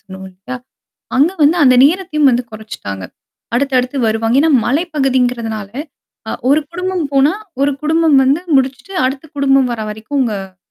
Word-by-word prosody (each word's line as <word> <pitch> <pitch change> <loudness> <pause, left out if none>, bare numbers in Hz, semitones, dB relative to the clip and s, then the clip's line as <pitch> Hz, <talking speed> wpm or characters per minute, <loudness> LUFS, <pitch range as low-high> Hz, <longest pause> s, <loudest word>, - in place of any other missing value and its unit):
சொல்லுவோம் 190 -1 -10
இல்லயா? 195 +8 -8 0.6
அங்க 290 +6 +4
வந்து 310 +4 +4
அந்த 255 -1 +6
நேரத்தையும் 305 -3 +2
வந்து 245 0 +1
குறச்சுட்டாங்க. 210 - -7 0.5
அடுத்து 275 0 0
அடுத்து 250 +3 -2
வருவாங்க. 225 +2 +1
ஏன்னா 320 - +3 0.2
மலைப்பகுதிகிறதுனால, 250 - -1 0.6
அ - - -3
ஒரு - - -7
1 305 - +4
குடும்பம் 365 -1 -2
போனா, 275 +3 +4 0.3
1 285 +1 +3
குடும்பம் 315 -2 +3
வந்து 275 +5 +2 0.2
முடிச்சிட்டு 265 +7 -2
அடுத்த 270 +3 -3
குடும்பம் 270 -2 +3
வர 220 - -4
வரைக்கும் 220 +6 -3
அங்க 195 -5 -5
265 Hz, 150 wpm, -16 LUFS, 225-295 Hz, 0.6 s, அந்த